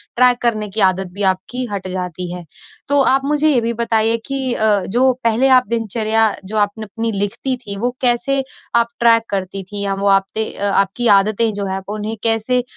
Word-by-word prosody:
Track 250 0 +5
करने 215 -3 -1
कि 210 +3 -2
आदत 190 0 +2
भी 200 +2 -3
आपकी, 190 +7 -1
हट 195 -2 -5
जाती 180 -1 -5
है। 180 -1 -7 0.4
तो 285 0 +2
आप 270 +1 +3
मुझे 300 +2 +1
ये 260 -5 +2
भी 230 +1 -2
बताइए 225 -1 +2
कि 265 -3 -2 0.4
जो 255 +4 +3
पहले 230 +3 +2
आप 255 -3 +4
दिनचर्या 225 -1 +1
जो 215 +3 -5
आपने 205 +1 -1
अपनी 225 +2 -4
लिखती 205 +6 -2
थी 205 -5 -6
वो 245 +3 -1
कैसे 255 +2 +2 0.3
आप 235 0 +4
ट्रैक 230 -1 +4
करती 195 0 -4
थी? 200 +2 -5
या 195 -1 -1
वो 200 +1 -2
आप 195 -1 +3
ते 220 0 -1
अ, - - -4
आपकी 200 +6 +1
आदतें 215 +3 0
जो 200 0 -4
हैं 190 0 -3
वो 210 - -4
उन्हें 215 +1 -4
कैसे 230 +2 +2
220 Hz, 200 wpm, -17 LUFS, 200-240 Hz, 0.4 s, ट्रैक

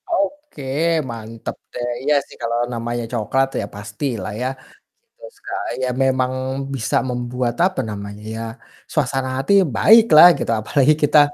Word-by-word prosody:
Oke, 295 - -2 0.5
mantap 115 -1 -7 0.2
deh, 120 0 -3
iya 150 +1 +3
sih - - -14
kalau 115 0 -1 0.2
namanya 120 0 -3
coklat 125 +3 +1
ya - - -3
pastilah 105 0 -5
ya, 125 - 0 0.7
kalau - - -11
suka 395 - -9 0.3
ya 130 - 0
memang 130 -1 +1 0.4
bisa 135 +3 0
membuat, 125 0 -2
apa 185 -6 -1
namanya 100 -1 -7 0.2
ya, 115 - -5 0.5
suasana 135 -3 0
hati 135 +9 +1 0.2
baik 225 +1 +7
lah 170 - +11
gitu - - -2
apalagi 140 +7 +3
kita 150 +1 +6
125 Hz, 145 wpm, -20 LUFS, 115-150 Hz, 0.7 s, lah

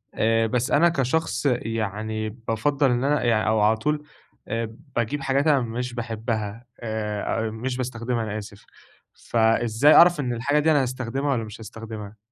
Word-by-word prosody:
آآ، 115 0 +2
بس 125 +2 -1
أنا 170 +4 +5
كشخص 155 +1 -1
يعني 110 -3 -1
بافضّل 125 +5 0
إن 120 +1 0
أنا 145 0 +1
يعني 115 -3 +2
أو 110 0 +3
على 110 +1 +4
طول 150 +5 -1 0.4
آآ 115 0 -3 0.2
باجيب 120 +5 -1
حاجات 135 +3 +1
أنا 145 -3 +5
مش 120 +1 -4
باحبها، 115 -1 -4
آآ، 110 0 -2
أ - - -4
مش 125 +3 -4
باستخدمها 120 -2 -2
أنا 105 0 -4
آسف، 100 -1 -10 0.5
فإزاي 115 +4 +3
أعرف 175 -2 +7
إن 125 -3 -1
الحاجة 140 +6 +1
دي 160 +1 +3
أنا 145 -2 +4
هاستخدمها 130 +2 -2
والّا 115 -4 0
مش 105 +1 -9
هاستخدمها؟ 110 -1 -8
115 Hz, 165 wpm, -24 LUFS, 110-135 Hz, 0.5 s, أعرف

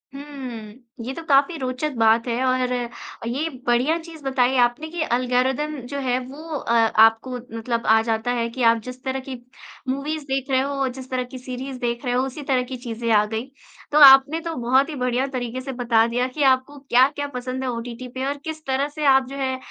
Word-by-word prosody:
हुँ। 260 -7 -8 0.3
ये 260 - -4
तो 330 - -8
काफ़ी 280 +4 +4
रोचक 260 +2 -2
बात 225 +1 +3
है 240 +2 -1
और 255 -1 +1 0.6
ये 280 +7 -1 0.2
बढ़िया 250 +7 +2
चीज़ 325 -2 -12
बताई 265 -1 +1
आपने 240 +6 -4
कि 340 0 -4
एल्गोरिदम 255 +4 0
जो 280 +2 -4
है 250 -2 0
वो 270 +2 -11 0.2
अ, 245 - -4
आपको 225 +1 +4 0.3
मतलब 230 +1 -2
आ 220 0 +6
जाता 225 +1 -1
है 235 -1 -1
कि 245 +2 -4
आप 230 0 +5
जिस 255 +1 -9
तरह 265 0 -2
की 265 - -5 0.5
मूवीज़ 290 +3 -2
देख 270 0 -2
रहे 260 -1 +3
हो 275 0 -1
जिस 260 0 -8
तरह 255 -1 -1
की - - -5
सीरीज़ 255 +1 -6
देख 235 +1 -3
रहे 245 - 0
हो 250 +1 +2
उसी 270 +3 -7
तरह 260 -2 +1
की 260 - -4
चीज़ें 235 -1 -5
आ 210 -1 +5
गई। 220 +2 -4 0.5
तो 295 - +4
आपने 270 +4 +7
तो 330 -1 -4
बहुत 255 +4 +2
ही 305 - -5
बढ़िया 250 +2 0
तरीके 245 0 -3
से 270 +1 -5
बता 235 -3 +2
दिया 245 +2 0
कि 285 +3 -2
आपको 260 +3 -5
क्या-क्या 275 +2 +2
पसंद 255 +1 -4
है 260 - -1
ओटीटी 240 +1 -6
पे 260 +1 -2
और 285 +1 -2
किस 315 -1 -6
तरह 270 +1 0
से 305 - -2
आप 265 -2 +5
जो 275 - -7
है 260 -1 -1
255 Hz, 215 wpm, -23 LUFS, 240-275 Hz, 0.6 s, आपने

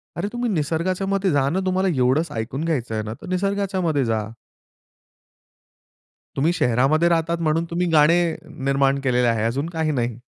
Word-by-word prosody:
अरे 175 +4 -2
तुम्ही 240 -1 -1
निसर्गाच्यामध्ये 185 +4 0
जा 140 -1 +2
ना 185 +5 -1
तुम्हाला 185 +1 +1
एवढंच 135 +6 +2
ऐकून 120 +5 -4
घ्यायचं 130 -9 -2
आहे 110 - -2
ना 110 +1 -5
तर - - -9
निसर्गाच्यामध्ये 185 -6 0
जा. 110 -1 -1 2.1
तुम्ही 150 +5 +2
शहरामध्ये 140 +5 +2
राहतात 170 0 +1
म्हणून 160 +1 +1
तुम्ही 175 +1 -1
गाणे 160 +2 +5 0.5
निर्माण 135 0 +2
केलेले 125 -2 +2
आहे 115 -2 +1
अजून 135 +8 -1
काही 160 -2 -1
नाही. 120 -4 -2
155 Hz, 150 wpm, -22 LUFS, 130-175 Hz, 2.1 s, गाणे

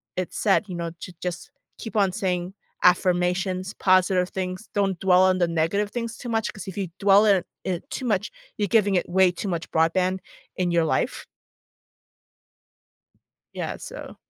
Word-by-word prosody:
it 185 -1 -3
said, 205 +1 +2
you 180 - -5
know, 170 -1 -3
to 180 - -8
just 180 +9 -5 0.3
keep 225 0 -7
on 195 -2 +3
saying 180 -1 -2 0.3
affirmations, 180 +1 +2
positive 185 -1 +3
things, 185 +2 -5
don't 195 -3 +1
dwell 185 -1 +5
on 185 0 +3
the 175 - +3
negative 170 +6 0
things 230 -1 -4
too 245 - -7
much 225 -1 0
'cause 195 -3 -9
if 190 - -6
you 195 -3 -2
dwell 200 +1 +5
on 200 -2 +6
it 175 - -5 0.2
it 185 - -3
too 260 - -5
much, 210 -3 0 0.3
you're 205 - 0
giving 205 -3 +3
it 175 - +1
way 185 0 +4
too 180 +3 -5
much 170 -1 -3
broadband 180 +3 +2 0.4
in 180 -1 0
your 170 -1 +3
life. - - -1 2.3
Yeah. - - -4
So - - -9
185 Hz, 170 wpm, -24 LUFS, 180-200 Hz, 2.3 s, on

